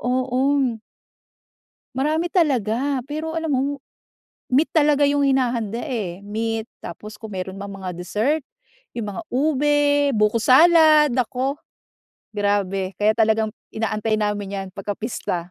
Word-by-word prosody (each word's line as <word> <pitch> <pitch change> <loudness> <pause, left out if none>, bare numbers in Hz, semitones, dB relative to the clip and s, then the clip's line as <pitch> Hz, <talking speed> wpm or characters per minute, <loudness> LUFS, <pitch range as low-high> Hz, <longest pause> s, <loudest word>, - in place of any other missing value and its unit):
Oo. 255 0 +1 1.2
Marami 305 +5 0
talaga! 270 - 0
Pero, 315 +3 -4
alam 320 -2 -1
mo, 260 - +2 0.9
meat 275 +5 +4
talaga 295 -2 +4
yung 285 0 +2
hinahanda, 245 -5 +1
eh, 200 - -4
meat 225 +1 -2 0.2
tapos 210 +6 -9
kung 220 - -7
meron 185 +1 -4
mang 200 +1 -7
mga 190 -2 -6
dessert, 215 - -1 0.6
yung 210 -3 -4
mga - - -5
ube, 290 +1 +2
buko 210 +2 +2
salad. 310 +1 +6
Naku, 255 +2 -1 0.8
grabe! 200 -2 -1
Kaya, 210 +3 +3
talagang 220 -1 +1 0.2
inaantay 220 0 -1
namin 205 -2 -2
'yan 195 -1 -4
pagka-pista. 195 -3 -4
235 Hz, 120 wpm, -22 LUFS, 205-285 Hz, 1.2 s, salad